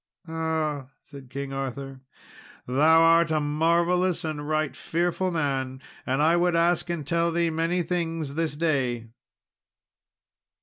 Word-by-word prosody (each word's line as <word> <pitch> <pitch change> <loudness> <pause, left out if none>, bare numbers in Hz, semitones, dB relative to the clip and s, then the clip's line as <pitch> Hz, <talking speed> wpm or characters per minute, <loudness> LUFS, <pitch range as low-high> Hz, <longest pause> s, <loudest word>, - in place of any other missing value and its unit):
"Ah," 160 -4 -2 0.2
said 140 -3 -13
King 140 +1 -5
Arthur, 135 0 -5 0.6
"thou 155 +6 +5
art 165 0 +5
a 155 -1 +1
marvellous 170 +4 +1
and 150 -1 -4
right 155 -2 0
fearful 175 +2 -1
man, 135 -5 -2 0.3
and 135 +3 +1
I 165 +2 +4
would 175 0 +2
ask 170 +1 +2
and 170 -4 -3
tell 170 +2 +1
thee 170 0 +1
many 165 +2 0
things 165 -4 -2
this 160 -1 -1
day." 130 -8 -1
160 Hz, 130 wpm, -26 LUFS, 140-170 Hz, 0.6 s, thou